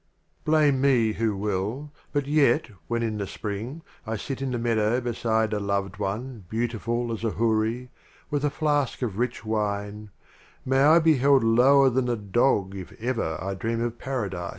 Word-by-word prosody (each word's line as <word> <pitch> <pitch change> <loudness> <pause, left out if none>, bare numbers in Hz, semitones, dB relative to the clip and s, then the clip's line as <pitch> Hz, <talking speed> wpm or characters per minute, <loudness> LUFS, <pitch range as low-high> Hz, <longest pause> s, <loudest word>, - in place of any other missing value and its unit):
XII - - -44
A. - - -40
Blame 150 -4 +3
me 120 -6 +3
who 110 -3 -1
will, 105 +8 -3 0.2
but 145 -2 0
yet, 140 -5 +2 0.2
when 115 0 -1
in 110 -2 -2
the 100 - -3
Spring, 110 - -5 0.2
I 110 0 -2
sit 135 +5 -5
in 135 - -1
the 125 - -2
Meadow 115 0 +1
beside 110 -2 0
a 105 - 0
Loved 100 -1 -2
One 105 +2 -4
beautiful 120 +1 -2
as 115 - -6
a 115 - +1
Houri, 115 +3 0 0.4
With 145 -1 -1
a 145 - +2
flask 145 -3 0
of 110 -4 -3
Rich 120 -2 -2
Wine, 105 -1 -2 0.6
May 135 +1 +2
I 155 +4 +7
be 160 -3 +4
held 135 0 +4
lower 130 +4 +5
than 125 0 0
a 120 - +1
Dog 100 -1 +1
if 95 -3 -8
ever 115 -9 -2
I 95 +3 -3
dream 115 +4 -2
of 120 0 -4
Paradise 100 -10 -3
115 Hz, 185 wpm, -25 LUFS, 105-130 Hz, 0.6 s, I